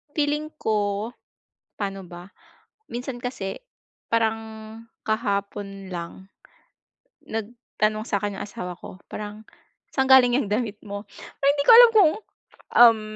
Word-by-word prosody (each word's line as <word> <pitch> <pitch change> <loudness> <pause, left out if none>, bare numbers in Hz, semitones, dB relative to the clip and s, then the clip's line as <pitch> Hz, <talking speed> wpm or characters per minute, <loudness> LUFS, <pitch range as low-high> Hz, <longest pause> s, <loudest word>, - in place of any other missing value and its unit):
feeling 300 +1 0
ko, 210 0 0 0.7
pa'no 195 -1 -3
ba 175 +1 -11 0.6
minsan 245 +1 -4
kasi 220 -6 -4 0.6
parang 225 -1 +2 0.7
kahapon 200 -3 -2
lang 175 +2 -7 1.0
nagtanong 220 -1 -2
sa'kin 200 0 -2
yung - - -4
asawa 180 -3 -7
ko 185 - -10
parang 210 +1 -7 0.5
"saan 265 -1 +1
galing 250 -2 +7
ng 225 - -2
damit 215 -2 -1
mo?" 200 +1 -5 0.4
Hindi 285 +1 +3
ko - - +9
alam 480 0 +10
kung, 345 -7 +7 0.7
um, 230 -2 +8
215 Hz, 115 wpm, -24 LUFS, 200-245 Hz, 1.0 s, alam